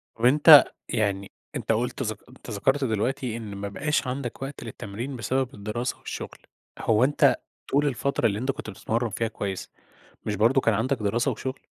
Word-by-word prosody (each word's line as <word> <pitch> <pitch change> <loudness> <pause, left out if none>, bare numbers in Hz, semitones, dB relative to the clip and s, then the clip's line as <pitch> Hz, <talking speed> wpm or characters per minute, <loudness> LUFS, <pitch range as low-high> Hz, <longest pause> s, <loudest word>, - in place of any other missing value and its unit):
طَب 115 - -1
أنت، 150 +3 +9 0.3
يعني 100 -4 -1 0.2
أنت - - -1
قُلت - - -1
ذك - - -3
أنت - - -13
ذكرت 135 +8 +1
دلوقتي 120 +1 -1
إن 105 -3 -7
ما 100 +1 -4
بقاش 140 +7 -1
عندك 125 -1 -4
وقت 135 +1 -6
للتمرين 115 +4 -6
بسبب 130 +3 -1
الدراسة 110 +4 -3
والشغل، - - -7 0.4
هو 115 +1 +3
أنت 145 +3 +4 0.4
طول 145 +1 +3
الفترة 140 -1 0
اللي 100 -1 -2
أنت 130 +3 0
كنت 120 - -8
بتتمرن 115 +3 -2
فيها 115 +2 -1
كويس، 100 -3 -5 0.5
مش 105 - -1
برضه 115 +6 +4
كان 115 - +3
عندك 130 +6 0
دراسة 110 +4 +1
وشغل؟ 130 0 -5
120 Hz, 175 wpm, -26 LUFS, 105-135 Hz, 0.5 s, أنت